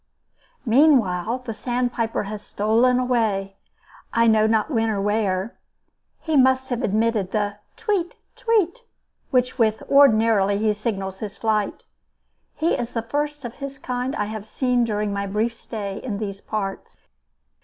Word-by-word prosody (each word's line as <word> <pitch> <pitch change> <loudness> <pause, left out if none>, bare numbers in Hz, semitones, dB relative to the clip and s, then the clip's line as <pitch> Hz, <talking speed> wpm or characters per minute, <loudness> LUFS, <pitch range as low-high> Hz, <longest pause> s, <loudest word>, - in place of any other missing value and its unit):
Meanwhile, 240 - +3
the 225 - -4
sandpiper 240 -1 -1
has 210 +1 -6
stolen 230 +6 +2
away, 220 -6 0 0.5
I 230 0 +3
know 220 -1 +4
not 220 +6 +1
when 225 -3 +1
or 210 -2 -1
where. 205 0 -1 0.6
He 320 -2 -1
must 260 -1 +4
have 245 -1 -1
omitted 220 -2 +1
the 205 -1 -1 0.2
tweet, 390 -5 -1 0.2
tweet, 440 -4 +1 0.5
with 250 -1 +3
which 220 -1 +2
ordinarily 220 -7 +5
he 215 0 +2
signalizes 195 -3 -4
his 210 -1 -6
flight. 215 -2 -1 0.7
He 325 +2 +1
is 240 -2 -3
the 230 - -2
first 295 +3 -3
of 235 - -5
his 275 -1 -6
kind 250 +2 -3
that - - -2
I - - +1
have 215 0 -6
seen 250 -2 +1
during 210 -2 -1
my 200 0 -2
brief 215 +4 0
stay 205 -4 -6
in 215 -6 -4
these 200 -2 -5
parts. 195 -2 -5
225 Hz, 150 wpm, -23 LUFS, 205-250 Hz, 0.7 s, ordinarily